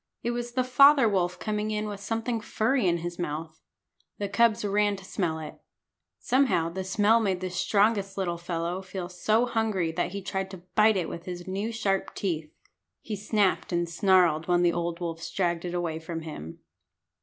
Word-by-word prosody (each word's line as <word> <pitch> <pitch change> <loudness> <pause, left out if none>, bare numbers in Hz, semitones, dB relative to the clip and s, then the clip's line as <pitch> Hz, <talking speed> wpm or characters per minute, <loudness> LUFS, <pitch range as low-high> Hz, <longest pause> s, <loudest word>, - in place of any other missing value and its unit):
It 235 - 0
was 240 0 -4
the 255 0 +1
father 275 0 +6
wolf 180 -3 0
coming 210 +1 -2
in 215 0 -2
with 205 -1 -6
something 225 +2 -2
furry 225 +1 +1
in 170 -1 +2
his 175 0 -5
mouth. 160 -1 -4 0.6
The 205 - -2
cubs 225 0 +3
ran 205 0 +2
to 190 -1 -11
smell 175 -5 -1
it. 155 -1 -8 0.6
Somehow 255 -11 +2
the 190 +3 -4
smell 205 +4 +3
made 195 -5 0
the 185 0 -4
strongest 200 +1 +1
little 175 -3 -1
fellow 170 +1 -3
feel 190 -2 -6
so 215 +6 +2
hungry 220 -8 0
that 165 - -1
he 200 0 -5
tried 190 0 -3
to 190 -2 -10
bite 215 -1 +5
it 175 -3 -1
with 170 - -7
his 175 -1 -6
new 200 +4 -2
sharp 205 -4 -1
teeth. 160 -5 -3 0.5
He 215 - -4
snapped 205 -2 0
and 175 -1 0
snarled 170 -2 +3
when 175 0 +3
the 170 -1 +3
old 170 0 -2
wolves 165 -1 -4
dragged 175 -2 -1
it 175 0 -3
away 170 -2 -2
from 165 0 -5
him. 115 - -8
190 Hz, 190 wpm, -27 LUFS, 170-215 Hz, 0.6 s, father